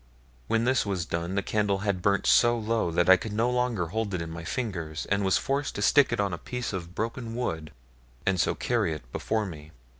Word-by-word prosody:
When 115 0 +2
this 130 +2 +2
was 95 -5 -2
done 85 +3 -3
the 100 - 0
candle 105 -2 0
had 100 -3 0
burnt 100 +1 +2
so 120 0 +5
low, 110 -4 0
that 85 +1 +1
I 95 0 +8
could 105 +3 -6
no 115 +3 +1
longer 125 -7 0
hold 105 0 -2
it 90 - -2
in 80 - -7
my 85 0 -7
fingers, 85 - -3
and 100 0 +2
was 95 -1 +3
forced 140 +1 -1
to 100 - -2
stick 140 +4 +5
it 115 - -1
on 100 -2 0
a 85 - -4
piece 125 +3 -4
of 95 -2 -2
the - - -15
broken 115 +4 -4
wood, 80 -11 -3 0.5
and 95 -2 +1
so - - +1
carry 110 -9 0
it 75 - -7
before 110 - -1
me. 80 -4 -9
100 Hz, 235 wpm, -27 LUFS, 85-115 Hz, 0.5 s, I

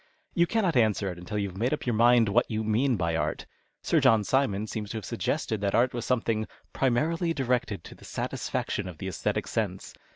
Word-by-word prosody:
You 170 0 +3
cannot 195 -7 +1
answer 110 -5 +2
it 90 - -9
until 95 +4 -5
you 100 -1 0
have 95 - -11
made 120 +7 +1
up - - -11
your 120 - +1
mind 120 +1 +5
what 100 - +2
you 110 0 -1
mean 120 +5 +2
by 85 -3 0
art. 80 - -2 0.4
Sir - - +3
John 110 -2 +4
Simon 110 -2 +1
seems 105 -1 -5
to 110 - -4
have 105 - -6
suggested 110 -2 -2
that 100 -1 +1
art 125 +2 +3
was 120 - -4
something 115 -3 0
" - - -37
primarily 165 +7 +1
directed 125 - -1
to - - -10
the - - -18
satisfaction 105 - -3
of 90 -3 -8
the 95 - -5
oesthetic 90 - -1
sense." - - -3
110 Hz, 220 wpm, -28 LUFS, 100-125 Hz, 0.4 s, mind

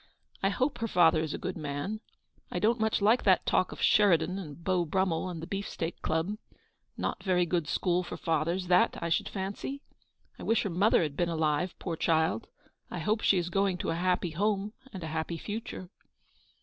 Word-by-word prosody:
I 195 - +3
hope 260 +7 -1
her 230 - -1
father 165 -5 +4
is 155 -2 -2
a - - -3
good - - -4
man. 145 +9 -3 0.5
I - - -4
don't 230 +2 +2
much 220 -2 +1
like 225 +4 +5
that 190 -3 +4
talk 185 - +2
of - - -6
Sheridan 185 -2 +4
and 165 -2 -9
Beau 185 -1 +2
Brummel 185 +1 0
and 165 -3 -6
the - - -3
Beefsteak 180 -3 -4
Club. 165 +7 -1 0.6
No - - -1
very 180 -2 +2
good 170 -3 -1
school 180 +3 +1
for 175 - -6
fathers, 165 +3 0
that, 180 0 +3
I 170 - -2
should 165 - +1
fancy. 200 +8 -4 0.6
I - - -9
wish 225 0 +2
her 200 - -2
mother 185 +2 +4
had 150 -3 -3
been 175 +2 0
alive, 160 +1 0
poor 170 -3 -3
child. 160 -9 +1 0.4
I - - -5
hope 210 +7 0
she 195 - +4
is 175 0 -1
going 195 -1 +1
to 165 - -2
a - - -1
happy 180 0 0
home, 205 +4 0 0.2
and 185 -3 -7
a - - -3
happy 165 +1 -2
future." 205 -2 -6
180 Hz, 200 wpm, -30 LUFS, 165-200 Hz, 0.6 s, like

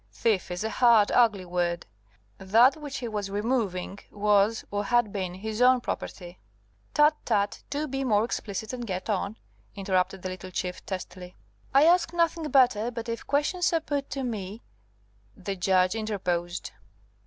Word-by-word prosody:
"Thief 190 - 0
is 180 +2 -4
a 220 - -1
hard, 230 -3 +5
ugly 220 -6 +3
word. 175 -1 -1 0.5
That 225 +8 +5
which 295 -3 -6
he 245 - -4
was 210 -3 -3
removing 205 -3 -2
was, 205 +1 +2
or 205 0 -2
had 240 -2 +2
been, 185 -3 -3
his 215 +4 -4
own 255 0 +6
property." 180 -6 -6 0.6
"Tut, 300 +1 +6
tut! 205 -3 0
do 295 +2 -2
be 270 0 -3
more 215 -4 +2
explicit 220 -1 -4
and 240 -2 -5
get 190 +2 -3
on," 200 +2 -2 0.4
interrupted 190 -1 -1
the 185 - -3
little 185 0 -7
Chief, 180 0 -4
testily. 185 -1 -7 0.4
"I 275 +2 +5
ask 345 0 +4
nothing 335 -2 0
better; 245 -5 +3
but 230 -1 -6
if 230 - -5
questions 300 +6 +1
are 330 - +3
put 285 -3 -3
to 270 - -4
me 215 -3 -5 0.4
" 105 0 -35
The 195 - -2
Judge 185 0 +2
interposed. 185 -5 -3
210 Hz, 165 wpm, -27 LUFS, 185-245 Hz, 0.6 s, own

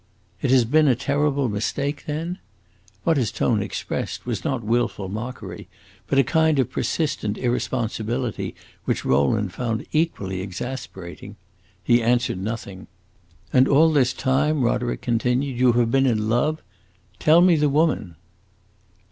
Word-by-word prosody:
"It - - 0
has 130 -2 +5
been 150 +6 +4
a 130 - +4
terrible 140 +1 0
mistake, 140 +7 -2
then?" 165 +5 -3 0.6
What 165 -2 +2
his 120 -6 0
tone 110 -4 +1
expressed 100 - -4
was 115 -6 -3
not 130 -4 -2
willful 115 -3 -1
mockery, 110 -4 -6 0.4
but 135 - 0
a 135 - +6
kind 160 +3 +2
of 130 -4 +1
persistent 140 -10 -1
irresponsibility 120 -1 -2 0.3
which - - -1
Rowland 90 +9 +1
found 115 0 -3
equally 100 - -1
exasperating. 95 -1 -7 0.5
He 120 +7 +4
answered 120 -4 +1
nothing. 100 -3 -6 0.7
"And 130 +1 +5
all 160 +3 +5
this 135 -5 +3
time," 140 +2 +1
Roderick 120 0 0
continued, 125 +2 0
"you 125 -1 +5
have 120 -1 +2
been 135 +1 +3
in 110 -3 +1
love? 150 +8 0 0.6
Tell 160 +3 +5
me 180 -1 +6
the 150 -1 +2
woman." 145 - +1
125 Hz, 140 wpm, -23 LUFS, 110-145 Hz, 0.7 s, a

